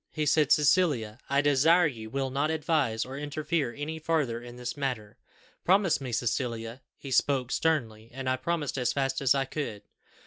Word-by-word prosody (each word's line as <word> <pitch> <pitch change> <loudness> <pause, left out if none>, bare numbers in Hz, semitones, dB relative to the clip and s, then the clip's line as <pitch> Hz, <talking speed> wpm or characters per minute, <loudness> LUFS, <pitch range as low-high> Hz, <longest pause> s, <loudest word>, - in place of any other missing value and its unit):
He 155 -1 -2
said, 150 0 +3
'Cecilia, 145 -8 +3
I 140 +1 +3
desire 150 +5 +4
you 115 -7 -4
will 135 +2 -2
not 140 +3 0
advise 150 -8 0
or 135 +2 -7
interfere 150 -1 -2
any 150 +6 -5
farther 150 -8 0
in 120 0 -10
this 125 -1 -5
matter. 125 -7 -3 0.5
Promise 185 -5 +3
me, 130 -2 -5
Cecilia!' 115 0 -2 0.2
He 135 - -9
spoke 130 -1 +2
sternly, 115 -9 -1
and 130 +1 -6
I 130 0 +1
promised 155 -3 -2
as 125 - +1
fast 135 -1 -1
as 135 0 +4
I 135 -1 +1
could. 135 -7 -5
135 Hz, 175 wpm, -28 LUFS, 120-150 Hz, 0.5 s, desire